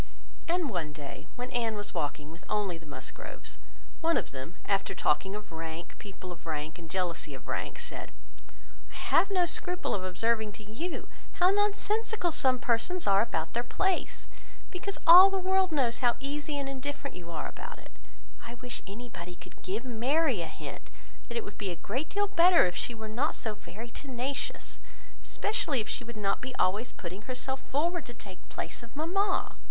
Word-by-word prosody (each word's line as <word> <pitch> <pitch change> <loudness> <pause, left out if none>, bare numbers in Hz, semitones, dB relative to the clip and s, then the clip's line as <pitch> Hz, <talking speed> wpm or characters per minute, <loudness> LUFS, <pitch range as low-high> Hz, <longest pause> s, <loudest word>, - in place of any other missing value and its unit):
And 345 -1 +2
one 165 - -2
day 145 -1 -7
when 250 +1 -4
Anne 230 -3 +1
was 205 -1 -2
walking 150 +1 -2
with 165 +2 -12
only 195 -5 0
the 165 - -14
Musgroves, 145 - -6 0.4
one 330 0 +4
of - - -2
them 135 +6 -6
after 195 -1 +1
talking 190 +6 +2
of 210 -3 -7
rank, 160 +1 -5
people 190 -2 -8
of 165 -1 -10
rank, 155 +2 -3
and 165 -1 -9
jealousy 180 -2 -1
of - - -11
rank, - - -2
said, - - -6 0.8
"I - - -12
have 395 - +4
no 370 -3 +4
scruple 355 +1 0
of 190 - 0
observing 220 +3 +1
to 215 - -11
you, 245 - -4 0.3
how 370 -1 +5
nonsensical 415 -1 +2
some 260 -4 +4
persons 260 +9 +1
are 195 0 +6
about 160 -8 -1
their 235 - +2
place, 380 +9 0 0.4
because 390 +2 -3
all 360 +4 +12
the 390 - 0
world 375 0 +3
knows 255 -6 +2
how 240 -2 +4
easy 290 +2 -2
and 280 -1 -2
indifferent 280 +1 -4
you 175 -1 -8
are 160 -2 -3
about - - -7
it; - - -14 0.5
but - - -9
I - - -6
wish 250 0 -5
anybody 195 -5 -7
could 180 +1 -14
give 215 +6 -2
Mary 255 - +2
a 165 - -2
hint 155 - -7 0.5
that - - -2
it 460 - 0
would - - -9
be 200 - -1
a 175 - -2
great 255 - -2
deal 410 0 +2
better 350 - +7
if 180 - 0
she 240 - -2
were 220 -1 -6
not 225 +5 +1
so 220 - -1
very 225 +3 -9
tenacious, 265 +1 -4 0.4
especially 320 - 0
if 215 - -2
she - - -2
would 235 -1 -8
not 195 -2 +1
be 255 0 -4
always 210 +4 +2
putting 185 +3 -6
herself 260 +2 -2
forward 335 +4 0
to 240 - -8
take 190 -3 -12
place - - -4
of 235 +2 -13
mamma. 375 +6 +1
240 Hz, 190 wpm, -31 LUFS, -, 0.8 s, all